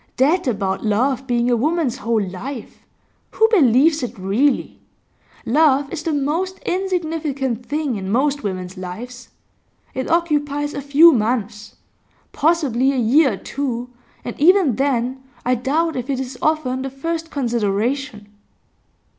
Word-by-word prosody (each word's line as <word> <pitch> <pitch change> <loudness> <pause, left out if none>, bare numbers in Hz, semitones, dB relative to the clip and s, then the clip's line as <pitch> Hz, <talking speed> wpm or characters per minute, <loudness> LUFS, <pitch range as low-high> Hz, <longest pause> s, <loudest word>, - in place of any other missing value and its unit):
That 300 +6 +2
about 195 -5 -1
love 255 +5 0
being 240 -1 +1
a - - +4
woman's 300 +1 0
whole 230 -2 0
life; 235 +7 -7 0.5
who 445 - +3
believes 300 - +4
it 245 -1 -5
really? 215 +9 0 0.7
Love 285 +1 +3
is 330 - -3
the 325 - -2
most 315 +7 -1
insignificant 315 - -2
thing 290 -4 -2
in 190 -1 -5
most 280 +5 +1
women's 185 -2 -5
lives. 235 +7 -8 0.6
It 260 - -3
occupies 290 -3 0
a 280 - -4
few 290 +5 +6
months, 220 -3 -2 0.6
possibly 285 -5 +2
a 275 - -2
year 255 +3 +4
or - - -5
two, 250 -2 -4 0.3
and 240 - -4
even 335 - +4
then 260 -1 0 0.2
I 250 - +2
doubt 300 +7 0
if 250 +1 -4
it 270 -2 -1
is 260 0 -5
often 295 -5 0
the 270 - -3
first 325 +5 -4
consideration. 235 -2 -2
265 Hz, 140 wpm, -20 LUFS, 235-300 Hz, 0.7 s, few